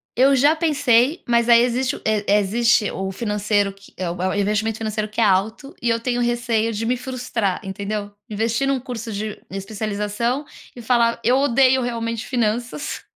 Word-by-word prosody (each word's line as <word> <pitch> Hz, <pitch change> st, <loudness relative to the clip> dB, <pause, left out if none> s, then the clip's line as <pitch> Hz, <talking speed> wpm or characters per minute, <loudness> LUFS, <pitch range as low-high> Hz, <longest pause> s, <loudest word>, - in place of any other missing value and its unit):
eu 270 Hz, +3 st, +5 dB
já 290 Hz, +5 st, +4 dB
pensei 285 Hz, -2 st, +2 dB
mas 235 Hz, 0 st, +2 dB
aí 235 Hz, 0 st, +7 dB
existe 250 Hz, +1 st, 0 dB
o -, -, -11 dB
e 215 Hz, -1 st, +1 dB, 0.2 s
existe 225 Hz, +1 st, +2 dB
o 190 Hz, 0 st, -4 dB
financeiro 210 Hz, -1 st, 0 dB
que 195 Hz, 0 st, -19 dB
é 180 Hz, -2 st, -2 dB
o 175 Hz, +1 st, -5 dB
é 185 Hz, -, +1 dB
o -, -, -2 dB
investimento 210 Hz, +2 st, 0 dB
financeiro 215 Hz, -1 st, -3 dB
que 225 Hz, +2 st, -2 dB
é -, -, +5 dB
alto 215 Hz, +8 st, 0 dB
e 235 Hz, -, 0 dB
eu 230 Hz, 0 st, +1 dB
tenho 245 Hz, 0 st, -1 dB
receio 235 Hz, -2 st, 0 dB
de 220 Hz, +2 st, -3 dB
me 250 Hz, +1 st, +1 dB
frustrar, 245 Hz, -6 st, -2 dB
entendeu? 205 Hz, +2 st, -4 dB, 0.2 s
Investir 225 Hz, +5 st, 0 dB
num 275 Hz, -1 st, +1 dB
curso 235 Hz, -3 st, -6 dB
de 210 Hz, +1 st, -4 dB
especialização 210 Hz, +6 st, -3 dB, 0.3 s
e 240 Hz, -, -9 dB
falar 235 Hz, 0 st, +2 dB
eu 250 Hz, +3 st, +4 dB
odeio 265 Hz, -1 st, +4 dB
realmente 230 Hz, -1 st, -3 dB
finanças. 240 Hz, +2 st, -2 dB
230 Hz, 180 wpm, -21 LUFS, 210-245 Hz, 0.3 s, aí